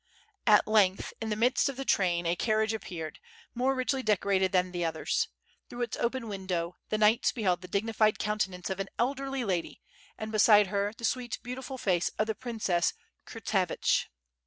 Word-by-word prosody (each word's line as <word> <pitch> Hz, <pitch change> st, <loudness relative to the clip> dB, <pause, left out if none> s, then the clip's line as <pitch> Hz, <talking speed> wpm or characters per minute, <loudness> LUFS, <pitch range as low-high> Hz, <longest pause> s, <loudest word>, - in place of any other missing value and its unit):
At 210 Hz, -1 st, +6 dB
lergth 200 Hz, -3 st, +2 dB
in 225 Hz, -, -2 dB
the 210 Hz, -, 0 dB
midst 245 Hz, +6 st, +2 dB
of 270 Hz, -, -6 dB
the 270 Hz, -, -4 dB
train 175 Hz, -6 st, +2 dB
a 170 Hz, +1 st, +1 dB
carriage 220 Hz, +3 st, +1 dB
appeared, 170 Hz, -7 st, -6 dB, 0.3 s
more 255 Hz, +2 st, +1 dB
richly 260 Hz, +1 st, 0 dB
decorated 200 Hz, -4 st, +2 dB
th 185 Hz, -, +4 dB
an 180 Hz, -, -11 dB
the 175 Hz, -1 st, -2 dB
others. 165 Hz, -, 0 dB, 0.4 s
Through 245 Hz, 0 st, -3 dB
its 235 Hz, -, -3 dB
open 235 Hz, 0 st, -1 dB
window 185 Hz, -4 st, -3 dB
the 215 Hz, -, 0 dB
knights 220 Hz, +1 st, +4 dB
beheld 190 Hz, -7 st, 0 dB
the 180 Hz, -, -9 dB
dignified 215 Hz, +2 st, +1 dB
counteance 190 Hz, -4 st, -2 dB
of 190 Hz, -, -3 dB
aii 195 Hz, -, -2 dB
elderly 270 Hz, +1 st, -1 dB
lady 180 Hz, -4 st, -2 dB, 0.4 s
and 215 Hz, 0 st, -5 dB
beside 210 Hz, -1 st, +6 dB
her 200 Hz, 0 st, 0 dB
the 235 Hz, -, -4 dB
sweet, 245 Hz, 0 st, -1 dB
beautiful 255 Hz, +2 st, -6 dB
face 180 Hz, -7 st, +1 dB
of 215 Hz, -, +2 dB
the 220 Hz, -, -1 dB
princess 210 Hz, -7 st, -1 dB, 0.3 s
Kurtsevich. -, -, 0 dB
215 Hz, 180 wpm, -29 LUFS, 185-240 Hz, 0.4 s, At